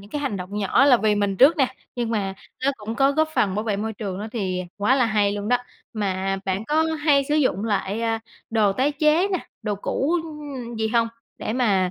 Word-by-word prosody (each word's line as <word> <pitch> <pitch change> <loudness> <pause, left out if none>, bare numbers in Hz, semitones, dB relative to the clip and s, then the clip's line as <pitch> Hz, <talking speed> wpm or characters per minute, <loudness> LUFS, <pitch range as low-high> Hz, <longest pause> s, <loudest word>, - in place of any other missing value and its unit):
những 200 +1 -15
cái 295 - -3
hành 275 -8 -2
động 190 +2 -5
nhỏ 210 +6 +3
là 275 -3 +7
vì 215 -2 +2
mình 200 -1 0
trước 280 - +6
nè, 265 -3 +1 0.2
nhưng 240 -2 -2
mà 200 -4 -1 0.3
nó 275 - +4
cũng 215 +1 -5
có 270 +3 +3
góp 315 +2 +2
phần 195 -9 +2
bảo 210 - -1
vệ 210 -3 0
môi 220 +2 -3
trường 200 -3 -5
nữa 210 - -4
thì 185 -5 -2
quá 210 +5 +3
là 255 - +3
hay 210 -2 +2
luôn 205 0 -4
đó. 245 - +4 0.4
Mà 195 -2 -1
bạn 195 +2 -1
có 305 +5 +2
hay 300 -3 +2
sử 295 - +2
dụng 255 -9 +1
lại, 205 -1 -1
a, 225 -1 0 0.3
đồ 215 -3 +3
tái 265 +8 +1
chế 310 +5 +3
nè, 370 -4 -2 0.2
đồ 210 -1 -1
cũ, 270 - -1
ưm, 290 -7 -7
gì 220 0 0
hông 230 0 +2 0.3
để - - -3
mà, 200 -7 +2
225 Hz, 235 wpm, -23 LUFS, 200-275 Hz, 0.4 s, là